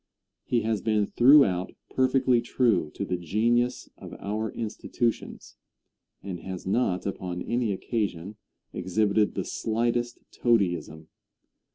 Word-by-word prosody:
He 120 - 0
has 110 -2 -1
been 110 -2 +1
throughout 120 -8 +5 0.2
perfectly 130 -2 +3
true 115 -9 +1
to - - -3
the 90 - -2
genius 115 +8 0
of - - -9
our 105 +2 -3
institutions, 115 +1 -3 0.7
and 95 -3 -5
has 95 0 -7
not 95 -2 0
upon 90 -2 -4
any 120 -2 0
occasion 100 -2 -3 0.4
exhibited 105 +3 +1
the - - -2
slightest 120 +2 -1
toadyism. 90 -8 0
110 Hz, 110 wpm, -27 LUFS, 95-120 Hz, 0.7 s, throughout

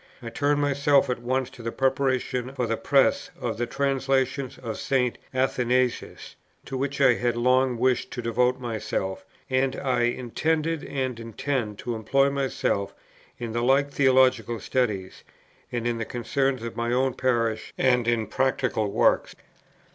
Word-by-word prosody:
I 115 -1 -7
turned 145 +4 +1
myself 140 -1 +3
at 125 - -3
once 130 +1 -1
to 125 - -12
the 115 0 -3
preparation 130 -1 0
for 125 - 0
the 115 0 0
Press 135 +3 +2
of - - -3
the 120 - 0
translations 135 0 0
of 115 -3 -6
St. 125 -3 0
Athanasius 130 -1 0 0.3
to 135 - -6
which 140 +1 -2
I 135 -3 +6
had 120 0 -1
long 125 +1 +3
wished 130 +1 +1
to 120 - -4
devote 125 +2 +1
myself, 110 -5 -3 0.2
and 130 0 +1
I 125 -3 +1
intended 155 +6 -1
and 130 -4 -3
intend 115 -1 -3
to 120 - -3
employ 135 +5 +2
myself 135 -7 -1 0.4
in 120 -2 -5
the 120 +1 -1
like 135 +3 +3
theological 130 -4 +3
studies, 105 -8 -2 0.5
and 120 -1 -3
in 120 -1 -1
the 115 - -2
concerns 130 +1 -1
of 115 - -5
my 120 0 -1
own 130 +1 +2
parish 115 -4 0
and 125 -2 +2
in 115 -2 +1
practical 120 -2 0
works. - - +2
125 Hz, 155 wpm, -25 LUFS, 120-135 Hz, 0.5 s, I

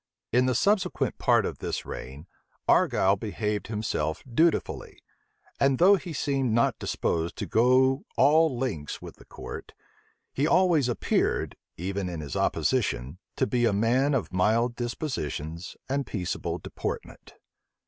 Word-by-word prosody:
In 125 +2 +3
the 130 - +1
subsequent 200 - +1
part - - +3
of - - -4
this - - -3
reign, 70 +5 -8 0.4
Argyle 95 +1 +4
behaved 105 0 -3
himself 105 -7 -2
dutifully; 160 +7 0 0.6
and 135 -1 +3
though 190 +6 +7
he 180 -2 -6
seemed 135 -5 0
not 115 +1 +2
disposed 85 0 -1
to - - -4
go 130 +4 +3
all 155 -2 +4
lengths 105 - -3
with - - -11
the - - -17
court, - - -9 0.6
he 140 +3 +1
always 170 -8 +3
appeared, 120 - 0 0.2
even 95 +2 -3
in 85 -2 -5
his 75 -3 -6
opposition, 65 +8 0 0.2
to - - +1
be 120 +2 +1
a 115 - +2
man 125 +7 +2
of 115 -7 -2
mild 115 +6 +2
dispositions 95 - -4
and 140 +1 -1
peaceable 90 -5 -3
deportment. - - -6
120 Hz, 140 wpm, -27 LUFS, 95-135 Hz, 0.6 s, though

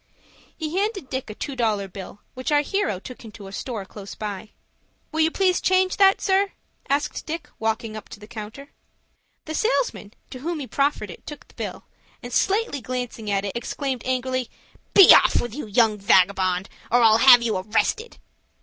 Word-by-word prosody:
He 315 +1 -4
handed 400 - -2
Dick 260 -2 -3
a 215 - -7
two 280 +3 -5
dollar 215 -5 0
bill, 195 +1 -10
which 255 +3 -4
our 290 0 +4
hero 345 - -1
took 250 +6 -11
into 215 -2 -11
a 195 - -9
store 215 -1 -5
close 200 0 -10
by. 210 0 -6 0.6
"Will 315 - -3
you 320 0 +4
please 370 +1 +1
change 370 0 +2
that, 390 -1 +5
sir?" 390 0 +1 0.4
said 290 +2 0
Dick, 325 -1 -4
walking 220 0 -2
up 215 - -9
to 210 - -10
the 210 - -11
counter. 220 +5 -9 0.7
The 315 - -5
salesman 435 - -1 0.2
to 255 - -7
whom 330 +4 -3
he 280 - -4
proffered 275 -5 -1
it - - -14
took 295 - -9
the - - -22
bill, - - -6 0.4
and, 245 0 -7
slightly 390 - +1
glancing 245 -3 -5
at 200 0 0
it, 200 - -4
exclaimed 255 +1 -3
angrily, 255 -1 -1 0.5
"Be 390 - +10
off, - - +5 0.2
you 285 -3 -6
young 215 0 +2
vagabond, 185 -1 +3 0.2
or 245 +1 +4
I'll 220 0 +6
have 245 -1 +8
you 220 -4 0
arrested." 220 - -1
250 Hz, 180 wpm, -23 LUFS, 210-305 Hz, 0.7 s, Be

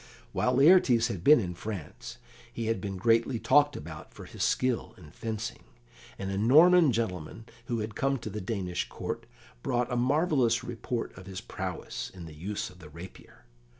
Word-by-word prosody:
While 125 - +1
Laertes 135 -6 +5
had 95 -7 -5
been 150 -1 +7
in 90 -5 -3
France, 90 -4 -7 0.3
he 115 - -4
had 115 -3 -1
been 95 -1 -4
greatly 115 +4 +2
talked 145 +6 +4
about 80 0 -9
for - - -9
his - - -9
skill 130 -2 0
in 75 -5 -14
fencing, 110 +4 -5 0.5
and 95 0 -4
a 100 - -2
Norman 155 - +6
gentleman 110 -2 -3 0.2
who 115 -2 -2
had 105 0 -4
come 135 +4 0
to 115 - -6
the 105 - -4
Danish 90 -3 -3
Court - - -5 0.3
brought 125 - -1
a - - +1
marvellous 130 -2 +2
report 120 0 -4
of 95 0 -12
his 95 -1 -6
prowess - - -5
in 90 -2 -8
the 80 - -10
use 95 +7 -4
of 90 - -18
the 80 -4 -12
rapier. 85 -6 -12
115 Hz, 180 wpm, -29 LUFS, 95-125 Hz, 0.5 s, been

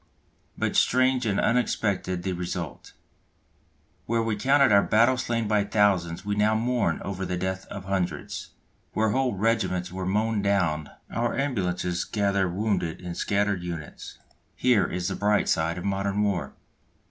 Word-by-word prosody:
But - - -1
strange 130 -1 +3
and 100 -2 +1
unexpected 100 -6 0
the 95 0 -1
result! 85 -3 -5 1.1
Where 115 0 +1
we 115 -1 0
counted 135 +4 +4
our 100 -1 +7
battle 115 +6 +4
slain 115 -3 -1
by 105 -1 +2
thousands 100 -4 +1
we 105 - -1
now 105 +1 +2
mourn 115 -7 0
over 95 -1 -4
the 90 -1 -2
death 95 +1 -3
of 100 -2 -8
hundreds; 90 -6 -3 0.4
where 110 0 +2
whole 130 -1 +1
regiments 95 -4 0
were 95 0 -4
mown 105 +2 +1
down 90 -7 0 0.2
our 120 0 -1
ambulances 90 -10 -1
gather 100 -3 0
wounded 90 -3 -1
in 90 -1 -6
scattered 100 +1 0
units. 85 -4 -7 0.4
Here 115 -8 +3
is 90 0 -3
the - - -2
bright 105 0 +2
side 80 +2 +1
of 90 - -5
modern 100 +1 0
war. 100 -4 -1
100 Hz, 150 wpm, -26 LUFS, 90-110 Hz, 1.1 s, our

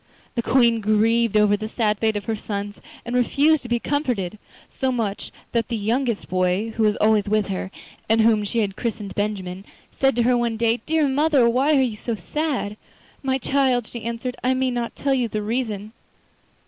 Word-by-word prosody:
The 235 - 0
Queen 235 -2 +3
grieved 220 +1 +2
over 210 -1 +4
the 215 +1 -5
sad 215 -2 0
fate 220 -1 +1
of 205 - -3
her 225 - -1
sons 205 -1 -5 0.2
and 240 +1 -3
refused 285 +5 +3
to 245 - -9
be 240 - +2
comforted, 230 - -2 0.3
so 265 -1 -2
much 220 -5 -2
so - - -12 0.2
that 230 -1 0
the 230 - -2
youngest 230 +2 -1
boy, 185 +4 0
who 225 - -4
was 210 -1 +3
always 215 -1 +3
with 215 -1 +1
her, 185 -1 -3 0.4
and 225 0 +4
whom 220 -1 +4
she 225 +3 -1
had 195 -2 -2
christened 220 -4 -4
Benjamin, 195 -3 -3 0.3
said 270 -2 +1
to 240 - +2
her 250 +1 +3
one 235 -2 0
day: 230 +1 +1
'Dear 315 -2 +2
mother, 280 -2 +3
why 270 +5 +3
are - - +4
you 235 -4 -1
so 230 +1 -3
sad?' 250 - -3 0.4
'My 265 -1 0
child,' 260 -2 +1
she 235 +1 -8
answered, 235 +2 -4
'I 255 +1 +2
may 260 0 0
not 240 -1 -3
tell 275 -1 0
you 250 -3 +1
the 215 -1 -3
reason. 215 -2 -3
230 Hz, 200 wpm, -23 LUFS, 210-250 Hz, 0.4 s, over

